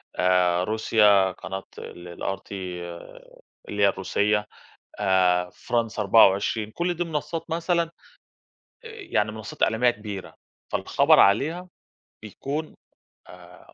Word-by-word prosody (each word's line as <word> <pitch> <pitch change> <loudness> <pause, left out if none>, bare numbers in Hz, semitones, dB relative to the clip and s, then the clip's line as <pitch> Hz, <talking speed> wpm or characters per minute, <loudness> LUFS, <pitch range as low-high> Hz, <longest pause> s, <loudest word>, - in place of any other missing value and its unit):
آآ، 90 -1 +2
روسيا 105 -2 +3
قناة 95 +1 -7
ال 90 0 -10 0.2
الRT 95 0 -4 1.2
اللي 105 0 -1
هي - - +7
الروسية 105 +2 0 0.5
آآ، 90 -2 +2
France 115 0 -3
24، 105 +1 +3
كل 175 +1 -1
دي 175 +1 -2
منصّات 160 +1 -4
مثلًا 170 +1 +1
آآ، 165 - -9 1.0
يعني 400 - -2
منصّات 110 -2 -5
إعلامية 115 +3 +3
كبيرة، 105 -5 -7 0.4
فالخبر - - +3
عليها 155 - +3 0.6
بيكون 140 +8 -5 0.5
آآ 90 0 -16
105 Hz, 105 wpm, -25 LUFS, 95-150 Hz, 1.2 s, هي